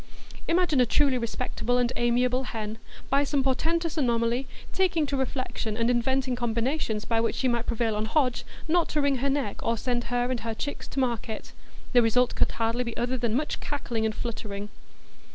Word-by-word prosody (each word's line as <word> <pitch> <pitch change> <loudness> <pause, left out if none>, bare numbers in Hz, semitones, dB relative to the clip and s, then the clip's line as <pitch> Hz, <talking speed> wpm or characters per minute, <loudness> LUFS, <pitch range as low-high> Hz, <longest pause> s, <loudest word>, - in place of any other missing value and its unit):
Imagine 335 -5 +3
a - - +5
truly 275 0 +3
respectable 235 +1 -1
and 245 0 +1
amiable 250 +2 +2
hen, 220 -2 -5 0.3
by 280 +1 +4
some 285 -1 +1
portentous 325 +5 0
anomaly, 240 0 +1 0.3
taking 350 -5 +2
to 280 - -2
reflection 255 -4 -2
and 230 +1 +2
inventing 255 +1 +1
combinations 235 -1 -1
by 225 -1 +1
which 230 - 0
she 260 - +1
might 235 -1 0
prevail 230 -2 0
on 210 +1 -1
Hodge 250 +1 +1 0.2
not 335 +1 +2
to 305 - 0
wring 280 -1 +2
her 275 +3 0
neck, 270 -7 -1
or 230 - 0
send 240 0 -1
her 245 +1 0
and 250 - -1
her 225 -1 -4
chicks 285 +5 -4
to - - -3
market; 235 -4 -2 0.4
the 245 - +7
result 245 +2 +3
could - - +1
hardly 230 +2 0
be 235 -2 -5
other 245 +2 0
than 235 -3 0
much 295 +4 -1
cackling 240 -6 -2
and 220 -1 0
fluttering. 210 -3 -5
245 Hz, 190 wpm, -27 LUFS, 230-270 Hz, 0.4 s, the